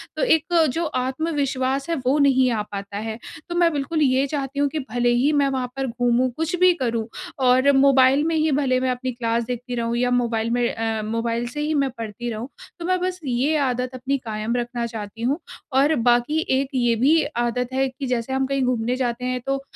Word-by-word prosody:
तो - - -1
एक 320 -11 +3 0.3
जो 335 - -1
आत्मविश्वास 275 0 -1
है, 335 - +1
वो 260 +1 +1
नहीं 260 -2 +4
आ 220 - 0
पाता 200 0 -6
है। 220 +1 -4 0.3
तो 345 - -3
मैं 345 -1 +4
बिल्कुल 300 +2 -1
ये 265 -1 +3
चाहती 280 -1 -3
हूँ 285 - +3
कि 310 - -3
भले 245 0 +1
ही 255 +5 +3
मैं 285 -1 +3
वहाँ 260 -2 -2
पर 270 -1 -2
घूमूँ, 245 +1 +1
कुछ 325 +3 -1
भी 365 0 +6
करूँ 235 -8 -2 0.4
और 260 +3 +5
मोबाइल 270 +1 +5
में 330 - 0
ही 310 -1 +2
भले 265 -2 +2
मैं 255 0 0
अपनी 255 +1 -3
क्लास 235 -1 -1
देखती 245 +1 -4
रहूँ 235 0 -1
या 250 +1 +1
मोबाइल 230 -2 0
में 245 0 +2
अ, 225 -1 -2
मोबाइल 230 +2 -2
से 295 +5 -5
ही 305 +1 0
मैं 275 -3 +1
पढ़ती 230 +1 -5
रहूँ। 225 +4 -5 0.3
तो 340 - -5
मैं 370 +1 +1
बस 365 0 -2
ये 265 +4 +1
आदत 250 0 -1
अपनी 260 +2 -1
कायम 220 +1 -2
रखना 240 0 -2
चाहती 225 -1 -7
हूँ 275 +8 0 0.3
और 285 +4 +4
बाकी 245 +6 +2 0.2
एक 275 - -2
ये 240 -2 +2
भी 295 +8 +4 0.2
आदत 250 +2 -2
है 265 +1 +1
कि 270 +2 -7
जैसे 250 +1 -2
हम 265 0 +1
कहीं 275 -1 0
घूमने 245 -1 0
जाते 250 -1 -2
हैं 255 0 -1
तो 275 0 -1
255 Hz, 215 wpm, -23 LUFS, 240-280 Hz, 0.4 s, भी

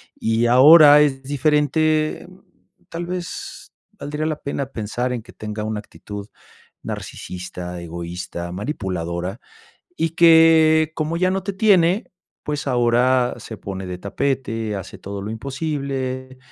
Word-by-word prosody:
y 115 +1 +1
ahora 145 +4 +8
es 135 -3 +1
diferente, 155 +3 +1 0.6
tal 170 +1 -5
vez 180 0 -6 0.3
valdría 150 +2 -4
la 155 -1 -1
pena 140 0 -3
pensar 120 +1 -3
en 120 - -4
que 115 - -15
tenga 105 0 -6
una 110 0 -3
actitud 105 -1 -9 0.6
narcisista, 90 -1 -7
egoísta, 85 +1 -6
manipuladora 90 - -4 0.6
y 165 - 0
que, 160 -1 +5
como 155 +2 -2
ya 185 +1 +2
no 190 0 -1
te 200 - -2
tiene, 190 -1 +3 0.3
pues 150 0 -3
ahora 125 0 +2
se 110 - -9
pone 95 -1 -6
de 90 -1 -5
tapete, 115 0 -2
hace 95 -1 -8
todo 100 0 -7
lo 100 - -5
imposible, 130 0 -4
130 Hz, 125 wpm, -21 LUFS, 105-155 Hz, 0.6 s, ahora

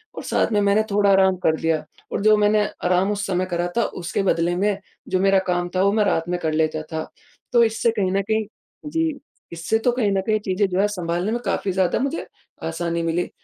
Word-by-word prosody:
और - - -6
साथ - - 0
में 210 - +2
मैंने 200 +2 +3
थोड़ा 200 0 +3
आराम 190 -1 +4
कर 160 0 +3
लिया। 160 -1 0 0.3
और - - -2
जो 215 +1 +5
मैंने 210 0 +3 0.2
आराम 180 +3 +2
उस 205 -1 -2
समय 185 -1 0
करा 175 0 0
था 235 - +4 0.2
उसके 175 +3 -1
बदले 175 -2 +1
में 200 +2 +1 0.3
जो 185 - +1
मेरा 195 0 +4
काम 175 -1 0
था 185 - +3
वो 200 - +4
मैं 215 -1 +3
रात 165 -4 0
में 180 0 -1
कर 160 -2 -1
लेता 155 0 0
था। 160 0 -4 0.4
तो 235 -1 +6
इससे 225 +1 +1
कहीं 200 -5 -1
न 195 +1 +1
कहीं 220 +2 -1 0.5
जी, 325 -2 -1 0.3
इससे 170 +6 -1
तो 245 +2 +2
कहीं 235 -4 0
न 195 -1 +1
कहीं 215 -1 +2
चीज़ें 200 0 0
जो 185 0 -1
है 205 - +3
सँभालने 180 0 -2
में 240 - -1
काफ़ी 195 - -1
ज़्यादा 185 -1 +1
मुझे 275 +6 -2 0.4
आसानी 170 +1 -2
मिली, 165 +2 -1
195 Hz, 230 wpm, -22 LUFS, 175-210 Hz, 0.5 s, तो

